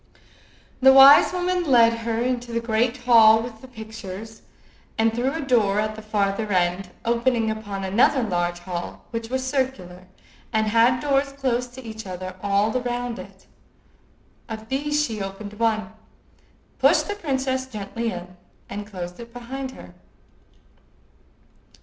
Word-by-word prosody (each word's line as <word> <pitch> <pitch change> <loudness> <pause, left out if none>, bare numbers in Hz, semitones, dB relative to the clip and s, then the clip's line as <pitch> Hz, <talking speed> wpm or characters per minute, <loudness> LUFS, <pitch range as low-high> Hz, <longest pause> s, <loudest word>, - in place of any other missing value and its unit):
The 265 +1 +8
wise 270 +1 +9
woman 360 0 0
led 235 -6 +5
her 230 0 -3
into 245 -1 -2
the 230 - 0
great 230 +1 0
hall 225 -2 +6
with 225 -2 -9
the 260 - -12
pictures, 220 -2 -9 0.6
and 225 0 +2
through 250 +4 -1
a 325 - -3
door 225 -7 +2
at 215 0 -1
the 220 - -9
farther 210 0 -1
end, 180 0 0 0.2
opening 235 -1 +1
upon 205 -3 -5
another 235 +7 +3
large 175 -4 -1
hall, 175 -1 -6
which 230 -1 -5
was 260 +1 -2
circular, 230 -10 -3 0.4
and 220 -1 +1
had 230 +3 +3
doors 275 -1 +1
close 250 -3 -1
to 250 +2 -12
each 220 -2 -8
other 185 0 -6
all 200 +2 +1
round 245 -1 -3
it. - - -12 1.0
Of 220 0 -7
these 295 +2 0
she 220 -5 -5
opened 195 +2 -6
one, 220 -1 0 0.9
pushed - - +4
the 410 - -2
princess 265 -8 -2
gently 230 0 -4
in, 180 0 -9 0.3
and 205 +1 -6
closed 180 -2 -7
it 235 0 -10
behind 260 +3 -6
her. - - -13
230 Hz, 145 wpm, -23 LUFS, 205-255 Hz, 1.0 s, wise